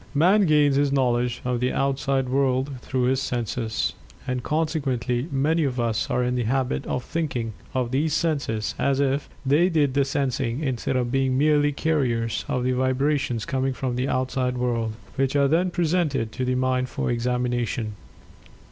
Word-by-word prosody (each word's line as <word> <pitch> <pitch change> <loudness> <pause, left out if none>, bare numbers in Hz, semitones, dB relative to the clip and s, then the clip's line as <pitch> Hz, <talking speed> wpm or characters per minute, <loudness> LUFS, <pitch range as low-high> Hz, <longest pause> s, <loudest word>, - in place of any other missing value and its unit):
Man 185 +6 +4
gains 145 -2 +4
his 145 -1 +2
knowledge 125 -3 +1
of 125 -1 0
the 125 +1 +1
outside 135 -1 0
world 130 0 0
through 130 0 -1
his 130 +1 +2
senses. 115 - -2 0.3
And, 125 -1 -2
consequently, 135 -5 -1
many 155 +4 +2
of 130 -3 -1
us 115 -2 0
are 125 - +1
in 125 0 0
the 125 -2 -1
habit 130 +2 -1
of 125 - -2
thinking 130 -9 -3 0.2
of 125 -2 0
these 150 +3 +1
senses 140 -11 -1
as 140 -1 +1
if 140 0 0 0.2
they 150 +7 +4
did 150 -6 +2
the 140 0 +3
sensing, 135 -1 -1
instead 130 -1 -1
of 125 -1 0
being 135 -1 +1
merely 145 0 +3
carriers 125 -7 0
of 125 - -1
the 130 - +1
vibrations 130 -2 0
coming 135 0 -1
from 125 -1 -3
the 125 +2 -1
outside 130 -1 -1
world, 115 -3 -1 0.2
which 135 +1 +1
are 140 -1 +4
then 170 +5 +2
presented 160 -9 0
to 130 - -3
the 125 0 0
Mind 130 0 0
for - - -2
examination. 120 -2 -1
130 Hz, 170 wpm, -24 LUFS, 125-140 Hz, 0.3 s, Man